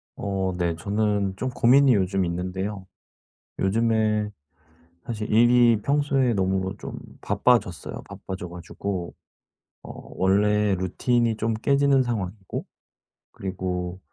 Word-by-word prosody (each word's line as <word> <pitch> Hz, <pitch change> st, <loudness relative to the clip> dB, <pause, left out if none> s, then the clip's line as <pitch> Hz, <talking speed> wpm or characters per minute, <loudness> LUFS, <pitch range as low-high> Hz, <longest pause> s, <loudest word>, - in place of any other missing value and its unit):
어 95 Hz, -2 st, -2 dB
네. 85 Hz, -2 st, 0 dB
저는 100 Hz, +2 st, 0 dB
좀 130 Hz, -, -2 dB
고민이 125 Hz, +1 st, +5 dB
요즘 95 Hz, 0 st, +1 dB
있는데요. 95 Hz, +3 st, -4 dB, 0.8 s
요즘에 110 Hz, 0 st, +1 dB, 0.7 s
사실 110 Hz, -2 st, -4 dB
일이 120 Hz, 0 st, +5 dB
평소에 140 Hz, -3 st, +2 dB
너무 95 Hz, 0 st, 0 dB
좀 -, -, -7 dB, 0.2 s
바빠졌어요. 105 Hz, -3 st, 0 dB
바빠져 95 Hz, -1 st, -7 dB
가지고 90 Hz, +1 st, -5 dB, 0.7 s
어 -, -, -11 dB, 0.3 s
원래 105 Hz, +2 st, +3 dB
루틴이 115 Hz, +5 st, 0 dB
좀 115 Hz, 0 st, 0 dB
깨지는 140 Hz, +3 st, +3 dB
상황이고 100 Hz, -5 st, -4 dB, 0.7 s
그리고 90 Hz, -1 st, -4 dB
105 Hz, 235 characters per minute, -25 LUFS, 95-115 Hz, 0.8 s, 고민이